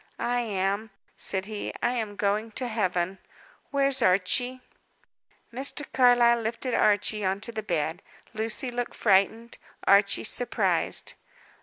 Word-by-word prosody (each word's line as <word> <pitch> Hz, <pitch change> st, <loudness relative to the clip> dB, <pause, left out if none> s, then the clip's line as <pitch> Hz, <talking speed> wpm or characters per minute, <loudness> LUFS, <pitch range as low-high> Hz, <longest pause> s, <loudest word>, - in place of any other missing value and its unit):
"I 245 Hz, 0 st, 0 dB
am," 200 Hz, 0 st, -2 dB, 0.3 s
said 190 Hz, 0 st, -2 dB
he. 210 Hz, 0 st, -5 dB
"I -, -, +2 dB
am 220 Hz, -4 st, -3 dB
going 210 Hz, +2 st, -1 dB
to 255 Hz, -, -3 dB
Heaven. 185 Hz, -4 st, -1 dB, 0.5 s
Where's 275 Hz, -2 st, +1 dB
Archie?" 235 Hz, +7 st, +1 dB, 0.9 s
Mr. 275 Hz, +3 st, -1 dB
Carlyle 245 Hz, -2 st, +5 dB
lifted 230 Hz, +3 st, -3 dB
Archie 210 Hz, 0 st, +2 dB
on 190 Hz, +1 st, 0 dB
to 235 Hz, -, -3 dB
the 220 Hz, -, -4 dB
bed. 170 Hz, -3 st, -2 dB, 0.3 s
Lucy 225 Hz, +3 st, -1 dB
looked 245 Hz, 0 st, -4 dB
frightened, 220 Hz, +3 st, +1 dB, 0.3 s
Archie 200 Hz, 0 st, +4 dB
surprised. 245 Hz, +2 st, +1 dB
220 Hz, 125 wpm, -27 LUFS, 200-245 Hz, 0.9 s, Carlyle